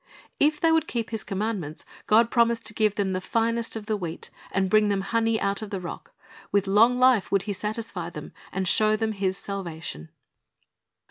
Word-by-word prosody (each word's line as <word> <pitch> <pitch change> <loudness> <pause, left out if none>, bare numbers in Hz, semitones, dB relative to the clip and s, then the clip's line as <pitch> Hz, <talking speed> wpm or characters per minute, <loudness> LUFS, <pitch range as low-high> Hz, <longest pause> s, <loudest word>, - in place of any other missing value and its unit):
"' - - -34
If 305 -1 -11
they 330 - +3
would 320 -1 +2
keep 230 -2 -3
His 220 -1 -3
commandments, 195 -6 -4 0.2
God 230 +2 +4
promised 235 -1 +2
to 210 - -1
give 215 -1 +1
them 195 -2 0
the 185 - -2
finest 230 +3 0
of 220 -2 -6
the 215 0 0
wheat, 175 -5 -6 0.2
and 190 0 +1
bring 210 +2 +4
them 200 -1 +1
honey 225 +2 +1
out 200 +1 -1
of 215 - -6
the 195 -2 -3
rock. 175 -2 -8 0.4
With 200 -1 +2
long 225 +6 +4
life 255 -5 +4
would 195 -1 +2
He 205 - -3
satisfy 210 -3 -4
them, 150 -3 -9 0.2
and 190 -1 -2
show 215 +3 +4
them 220 0 -1
His 195 -2 -1
salvation. 165 - -6
210 Hz, 200 wpm, -26 LUFS, 190-225 Hz, 0.4 s, God